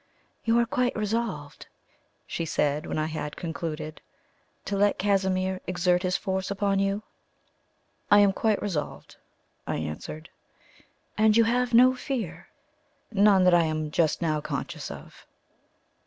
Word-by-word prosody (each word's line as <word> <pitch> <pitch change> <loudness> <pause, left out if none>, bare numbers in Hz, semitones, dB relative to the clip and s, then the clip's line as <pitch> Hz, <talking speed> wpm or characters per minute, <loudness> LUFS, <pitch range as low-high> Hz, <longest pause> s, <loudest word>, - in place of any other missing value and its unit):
"You 230 0 +3
are 235 - +4
quite 245 +1 0
resolved," 210 -9 -3 0.6
she - - -4
said, 150 -2 0
when - - -3
I 155 - 0
had 155 -2 -5
concluded, 155 -2 -5 0.6
"to 200 - -2
let 205 +1 +2
Casimir 190 -2 0
exert 180 0 +1
his 185 -1 0
force 190 0 -2
upon 200 0 0
you?" 195 +2 0 1.1
"I 205 - +7
am 200 -1 +4
quite 215 +1 +1
resolved," 165 -8 -4 0.5
I - - -1
answered. 80 - -6 0.9
"And 215 0 +5
you 230 - +6
have 245 +1 +1
no 255 +2 +7
fear?" 220 - -5 0.6
"None 200 -2 +5
that 180 -1 +5
I 170 -1 +5
am 155 -1 -2
just 160 +2 +1
now 155 -2 0
conscious - - -5
of." - - -11
190 Hz, 140 wpm, -26 LUFS, 160-210 Hz, 1.1 s, I